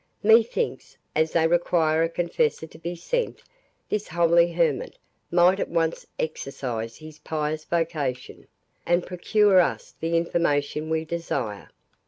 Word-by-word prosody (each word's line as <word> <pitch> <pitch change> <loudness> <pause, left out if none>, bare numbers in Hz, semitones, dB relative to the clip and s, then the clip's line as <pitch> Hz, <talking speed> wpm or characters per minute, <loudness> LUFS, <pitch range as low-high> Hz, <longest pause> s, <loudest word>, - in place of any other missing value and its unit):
Methinks, 230 - +2 0.2
as 160 +1 +2
they 165 -1 +3
require 165 -2 +2
a 165 - +2
confessor 175 - 0
to 160 0 -15
be 170 +2 -4
sent, 485 - -2 0.4
this 210 0 -2
holy 170 0 +3
hermit 165 -5 0 0.3
might 180 +3 +4
at - - -2
once 165 -1 -1
exercise 125 -7 -4
his 155 -1 -12
pious 155 0 -3
vocation, 155 -7 -3 0.4
and 175 +1 +1
procure 195 +2 +3
us 175 - 0
the 165 +1 0
information 155 -2 0
we 160 0 0
desire." 145 -11 -4
165 Hz, 130 wpm, -25 LUFS, 155-175 Hz, 0.4 s, might